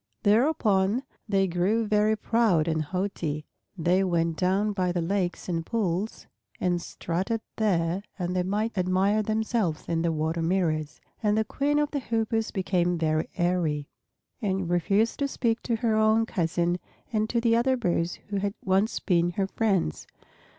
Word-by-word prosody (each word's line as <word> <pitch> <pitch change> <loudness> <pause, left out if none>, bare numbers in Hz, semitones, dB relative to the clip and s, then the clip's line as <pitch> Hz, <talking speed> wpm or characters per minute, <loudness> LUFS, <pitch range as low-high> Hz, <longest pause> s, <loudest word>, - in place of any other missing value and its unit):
Thereupon 215 -2 +3 0.3
they 195 -1 +3
grew 190 +6 +1
very 210 0 +3
proud 210 -8 +2
and 160 -1 +1
haughty. 160 -3 -3 0.3
They 180 +3 +2
went 170 -3 +1
down 190 +5 +1
by 185 -2 0
the 175 - -1
lakes 180 +1 -1
and 165 -2 -1
pools 200 0 -2 0.3
and 175 -1 0
strutted 185 +7 -3 0.2
there 180 -4 +1 0.2
that 180 -2 -2
they 185 - +1
might 210 +5 -1
admire 190 +3 +2
themselves 215 -5 -1
in 165 -1 0
the 170 0 +1
water 160 +1 -1
mirrors. 160 -3 0 0.2
And 210 0 +2
the 220 - +3
Queen 285 +6 0
of 295 0 +1
the 285 - -1
Hoopoes 225 -2 -1
became 180 -2 0
very 155 -1 0
airy, 170 -5 0 0.5
and 190 -4 -1
refused 200 +6 +1
to 280 - +1
speak 235 -4 -1
to 235 - -1
her 225 -1 +1
own 220 +1 +4
cousin 175 -3 0 0.3
and 215 0 +1
to 235 - +1
the 230 -1 +3
other 255 +2 +2
birds 175 -6 0
who 200 - -1
had 200 +1 -1
once 195 +3 +2
been 175 -3 +2
her 195 +2 0
friends. 195 - -1
190 Hz, 160 wpm, -27 LUFS, 175-220 Hz, 0.5 s, own